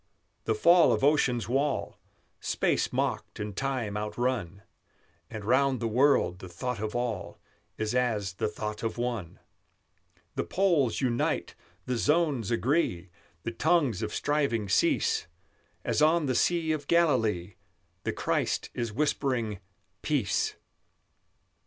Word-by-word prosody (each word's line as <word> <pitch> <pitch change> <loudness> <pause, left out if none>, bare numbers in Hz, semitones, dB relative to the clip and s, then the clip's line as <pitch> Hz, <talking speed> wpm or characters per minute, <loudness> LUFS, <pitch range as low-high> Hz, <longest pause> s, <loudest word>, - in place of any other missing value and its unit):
the 110 - +1
fall 170 +9 +6
of - - 0
Ocean's 135 -5 +3
wall 135 +3 -1 0.4
Space - - 0
mocked - - -2
and 105 -1 -4
time 130 -5 -2
outrun; 105 -3 -2 0.7
And 110 -2 -7
round 130 +2 +3
the 115 - -1
world 120 -6 +3
the 95 - -9
thought 115 +7 -4
of 110 +1 -4
all 120 -5 -3 0.4
Is 110 +1 -2
as 110 -7 0
the 110 +4 -1
thought 105 0 -5
of 115 +1 -3
one! 120 -8 -3 1.0
The - - -1
poles 165 - +1
unite, 120 -3 0 0.3
the 125 -1 -1
zones 145 - +1
agree, 115 - 0 0.3
The 115 - -3
tongues 145 - +2
of 110 -1 -2
striving 140 -8 0
cease; 85 - +2 0.6
As - - +1
on 160 +1 +4
the 130 - 0
Sea 165 +5 +2
of 150 -2 -3
Galilee 115 - +2 0.5
The - - -2
Christ - - -1
is 120 -2 -3
whispering, 125 -5 -1 0.4
Peace! 140 -9 0
120 Hz, 125 wpm, -28 LUFS, 105-145 Hz, 1.0 s, fall